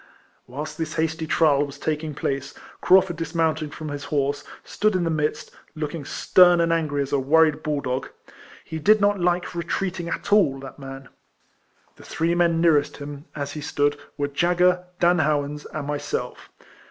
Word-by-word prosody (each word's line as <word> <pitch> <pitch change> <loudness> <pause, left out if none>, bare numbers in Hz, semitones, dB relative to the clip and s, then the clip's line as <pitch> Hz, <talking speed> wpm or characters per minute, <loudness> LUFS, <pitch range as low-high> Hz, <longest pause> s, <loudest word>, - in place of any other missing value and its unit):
Whilst 145 +7 -7
this 160 - -3
hasty 160 0 -1
trial 145 -4 +3
was 140 -1 -7
taking 155 0 -3
place, 140 0 -3 0.3
Craufurd 185 -2 +4
dismounting 160 -1 -1
from 155 +1 -7
his 145 0 -5
horse, 145 0 -1 0.2
stood 215 -1 0
in 180 - +1
the 165 - 0
midst, 150 -1 -2 0.2
looking 155 -1 -4
stern 175 +4 +5
and 165 0 +2
angry 150 -4 0
as 135 - -8
a 140 - +2
worried 155 +2 +3
bull 150 -2 -2
dog. 130 0 -3 0.6
He 160 - -5
did 215 +7 +5
not 205 -1 +2
like 175 0 0
retreating 175 +1 -3
at 205 - -2
all, 145 -10 +4
that 135 +1 -10
man. 135 -1 -9 0.9
The - - -14
three 165 +1 -1
men 170 -1 +2
nearest 155 -4 +3
him, 145 0 -8
as 145 -1 -4
he 150 - -6
stood, 145 0 0 0.2
were 145 -1 0
Jagger, 180 +4 +2
Dan 175 0 +4
Howans, 150 -1 -1
and 155 -2 -4
myself. 145 0 -4
155 Hz, 170 wpm, -24 LUFS, 145-170 Hz, 0.9 s, stern